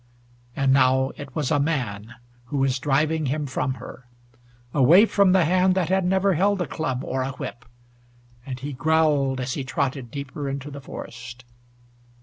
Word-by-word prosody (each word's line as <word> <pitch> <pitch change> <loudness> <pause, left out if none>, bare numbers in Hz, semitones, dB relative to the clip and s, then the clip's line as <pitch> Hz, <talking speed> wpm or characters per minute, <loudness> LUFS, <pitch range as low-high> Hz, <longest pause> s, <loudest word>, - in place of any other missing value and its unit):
And 135 -1 +2
now 130 0 +3
it 140 -2 -10
was 150 -3 -1
a 145 - +3
man 120 -7 -2 0.3
who 135 +4 -4
was 135 -1 +1
driving 150 +3 +1
him 150 +3 -1
from 130 -1 -2
her, 125 0 -11 0.7
away 160 - +6
from 200 -3 +3
the 185 -3 +4
hand 185 +2 +3
that 180 -3 0
had 190 -1 +2
never 190 +1 +2
held 195 +4 +2
a 175 - 0
club 130 -5 -3
or 130 0 -2
a 135 +1 -3
whip, 125 -2 -7 0.8
and 130 -1 -6
he 140 +2 -5
growled 145 -2 +2
as 130 +1 -2
he 140 - -3
trotted 130 -1 -2
deeper 140 +1 -5
into 140 +1 -5
the 140 0 -8
forest. 125 -1 -9
140 Hz, 170 wpm, -24 LUFS, 130-160 Hz, 0.8 s, away